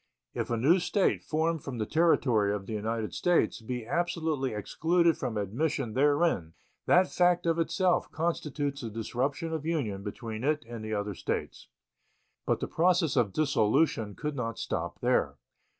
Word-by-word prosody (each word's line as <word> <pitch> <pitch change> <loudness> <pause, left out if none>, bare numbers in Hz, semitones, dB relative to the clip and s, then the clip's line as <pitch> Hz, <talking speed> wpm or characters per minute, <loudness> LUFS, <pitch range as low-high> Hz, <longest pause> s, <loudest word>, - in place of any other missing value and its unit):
If - - -3
a 120 - 0
new 155 +11 +4
State, 180 +2 +1
formed 160 0 -1
from 130 -3 -5
the 110 - -1
territory 125 -9 +3
of 100 -1 -6
the 110 - -6
United 110 +1 -2
States, 175 -8 +1
be 120 0 -4
absolutely 160 -3 -1
excluded 165 - +1
from 110 -3 -3
admission 120 - -1
therein, 145 - +2 0.3
that 180 +1 +4
fact 175 -1 +3
of 165 0 +1
itself 180 +2 +1
constitutes 150 -4 -2
the 115 - -4
disruption 130 +8 -2
of 160 -2 -3
union 140 -12 -2
between 110 +2 -6
it 150 -1 0
and 115 -2 -7
the 110 0 -2
other 105 0 -2
States. - - -4 0.8
But - - +1
the - - -1
process 175 -2 +2
of 120 -6 +2
dissolution 110 -4 +1
could 150 -1 -4
not 115 -4 -3
stop - - -4
there. - - +1
140 Hz, 160 wpm, -29 LUFS, 110-165 Hz, 0.8 s, new